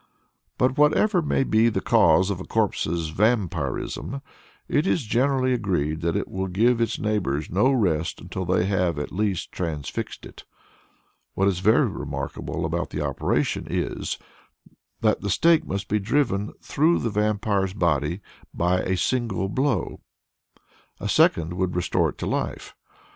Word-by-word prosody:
But 130 +3 +1
whatever 175 +6 +4
may 145 -3 +1
be 115 -2 +3
the 115 - -1
cause 95 -4 +4
of 95 - -3
a - - -5
corpse's 85 -7 -1
"vampirism," 100 - -1 0.4
it 150 +5 +1
is 165 - +1
generally 130 +3 +1
agreed 85 -9 -1
that 85 0 0
it - - -1
will 95 0 -3
give 115 +6 +2
its 115 -1 0
neighbors 90 -9 -1
no 105 +10 +3
rest 90 - 0
until 95 - -5
they 90 0 +1
have 90 -5 0
at 75 - -4
least 100 -2 -1
transfixed 80 -5 -4
it. - - -12 0.9
What 95 - +2
is 95 -3 +1
very 105 +4 +4
remarkable - - -4
about - - -2
the - - -3
operation - - -1
is, - - -2 0.8
that - - +2
the 100 - -3
stake 165 - +3
must 100 0 -3
be 105 - +1
driven 105 -2 0
through 160 +4 +2
the 115 - -2
vampire's 100 -2 0
body 85 -1 0 0.3
by 90 +2 +2
a 95 0 -1
single 115 -5 -1
blow. 130 +3 -1 1.0
A - - -3
second 85 +1 +3
would 90 0 -1
restore 90 - +1
it - - -10
to - - -4
life. - - -3
100 Hz, 150 wpm, -24 LUFS, 90-120 Hz, 1.0 s, whatever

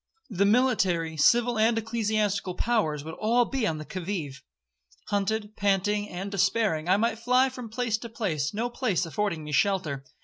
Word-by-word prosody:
The 200 0 +2
military, 195 -9 +2
civil, 240 +8 +3
and 225 +1 +3
ecclesiastical 215 -4 -1
powers, 180 -11 0
would 160 +1 -7
all 235 +3 +3
be 255 -3 -1
on 160 - -1
the 155 - -7
'qui 185 - -6
vive.' 155 -8 -4 0.7
Hunted, 210 +1 -1
panting, 205 +1 0
and 190 +3 -5
despairing, 195 -4 +1
I 190 - +5
might 225 +1 0
fly 250 +3 +3
from 250 -3 -8
place 225 -1 -1
to 235 - -8
place—no 210 - -2
place 220 -8 0
affording 170 -1 -2
me 150 - -7
shelter. 160 -6 0
205 Hz, 165 wpm, -27 LUFS, 180-230 Hz, 0.7 s, I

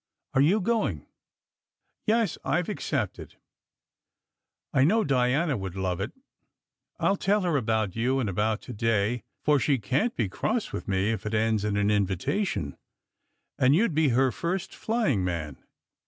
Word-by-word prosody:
Are 135 - +4
you 175 +10 +4
go 225 +2 +1
ing?" 80 -8 -6 1.0
"Yes, 225 -2 +2
I - - +1
ve - - -4
accepted." - - -3 0.7
" - - -61
I 130 - +4
know 215 +9 +4
Diana 135 +3 +2
would 95 -4 -5
love 95 -2 -2
it. - - -3 0.9
I - - +2
ll 200 - 0
tell 205 +3 +2
her 175 -4 0
about 110 -6 0
you 125 +4 +1
and 125 - 0
about 105 +3 0
to - - -7
day, 115 +1 +1 0.2
for 150 -1 +4
she 140 +1 +2
can 130 - 0
t - - -28
be - - -1
cross 220 - -2
with - - -5
me 95 +2 +1
if 110 -1 -3
it 110 - -1
ends 110 -1 +1
in 105 -1 0
an 105 +1 +2
invitation. 100 - -1 0.8
And 130 +2 +5
you 220 +7 +4
d - - -5
be 155 -1 +3
her 130 +2 +3
first 170 +8 -3
flying 215 - 0
man." 80 -6 -4
125 Hz, 175 wpm, -27 LUFS, 100-170 Hz, 1.0 s, And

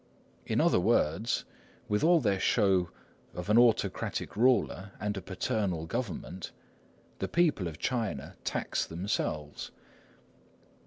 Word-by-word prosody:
In - - +1
other - - +4
words, 85 +10 +1 0.4
with 105 0 0
all 170 +1 +6
their 100 -5 +1
show 95 -6 +3 0.5
of 90 +3 -3
an 110 - +7
autocratic 120 -2 +1
ruler 105 -4 +2
and 105 0 -2
a 95 - -4
paternal 95 -2 -2
government, 95 -3 -4 0.7
the - - -1
people 155 - +2
of 80 -3 -7
China 110 - -2
tax - - -1
themselves. 80 -4 -3
100 Hz, 115 wpm, -30 LUFS, 90-115 Hz, 0.7 s, an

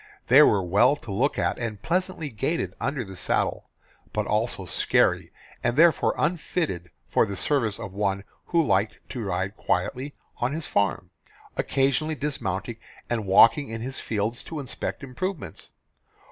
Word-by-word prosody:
They - - +9
were 100 -3 +5
well 100 +10 +4
to 120 -7 -9
look 130 +9 +1
at, - - 0
and 115 -4 -3
pleasantly 180 -4 -1
gaited 150 +10 -1
under 140 -4 -1
the 95 -2 -9
saddle, - - -1 0.4
but - - 0
also - - 0
scary - - +2 0.3
and 120 +1 +1
therefore 165 -1 +5
unfitted 150 - -1 0.2
for - - +2
the 100 - -4
service 115 -3 +1
of 100 -5 -7
one 100 -1 -1 0.2
who 165 -2 +2
liked 100 -1 +1
to 125 - -5
ride 95 +1 -2
quietly 125 +11 -2 0.2
on 125 +3 -1
his 160 0 -2
farm, 95 -2 0 0.4
occasionally 140 +4 +1
dismounting 115 -7 -3 0.3
and 110 -4 -1
walking 115 +8 +6
in 115 0 -5
his 130 +2 -4
fields 110 +2 -2
to 160 - -5
inspect 120 -3 -5
improvements. 170 +7 -4
120 Hz, 150 wpm, -26 LUFS, 100-145 Hz, 0.4 s, They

